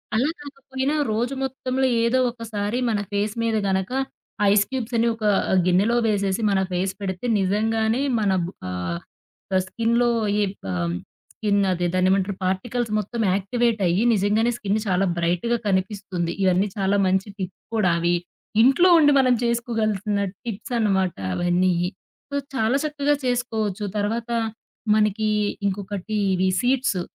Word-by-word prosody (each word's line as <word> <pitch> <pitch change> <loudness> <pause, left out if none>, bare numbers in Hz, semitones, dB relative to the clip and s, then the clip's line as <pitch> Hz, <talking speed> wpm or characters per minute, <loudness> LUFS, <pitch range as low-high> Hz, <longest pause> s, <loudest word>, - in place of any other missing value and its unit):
అలా 255 +7 +2
కాకపోయినా 275 -1 -4 0.2
రోజు 235 +5 -1
మొత్తంలో 265 0 -1 0.2
ఏదో 235 +3 +2
ఒకసారి 225 -2 -3
మన 215 -2 0
ఫేస్ 205 +1 -1
మీద 225 -1 +1
గనక 190 +2 0 0.6
ఐస్ 205 0 +5
క్యూబ్స్ 250 -2 -3
అని 230 +1 +3
ఒక 225 - -10 0.4
గిన్నెలో 190 +6 +3
వేసేసి 200 -1 0
మన 195 - +2
ఫేస్ 185 +1 -1
పెడితే, 190 +2 -4
నిజంగానే 220 +5 +1 0.2
మన 205 -2 +1 0.4
ఆహ్, 90 -2 -3 0.7
స్కిన్‌లో 235 +4 +1 0.3
ఈ - - +3 0.3
ఆహ్, 85 -1 -1 0.4
స్కిన్నదే 195 -4 +1
దాన్నేమంటరు 190 +2 +2
పార్టికల్స్ 225 +6 -1
మొత్తం 225 +3 -4
యాక్టివేట్ 220 +3 0
అయ్యి, 175 +6 +2
నిజంగానే 215 +3 +2
స్కిన్ 205 0 -1
చాలా 190 0 +2
బ్రైట్‌గా 175 +8 0
కనిపిస్తుంది. 190 -3 -1
ఇయన్నీ 190 +2 +3
చాలా 195 0 +1
మంచి 190 +2 +1
టిప్ 185 -2 -4 0.2
కూడా 210 -5 +3
అవి, 170 +1 +2 0.5
ఇంట్లో 275 +10 +5
ఉండి 295 -3 +5
మనం 255 -2 +4
చేసుకోగలిసిన 225 -4 0 0.2
టిప్సనమాట 210 -4 -1 0.2
అవన్నీయి. 175 - +1 0.4
సో, 285 - -5 0.2
చాలా 245 +1 +2
చక్కగా 295 -1 +1
చేసుకోవచ్చు, 220 -5 -1
తర్వాత 225 +3 -2 0.7
మనకి 215 0 +1 0.4
ఇంకొకటి 200 +1 -3 0.2
ఇవి 185 +1 +2
సీడ్సు, 250 -6 +1
210 Hz, 125 wpm, -23 LUFS, 190-235 Hz, 0.7 s, ఐస్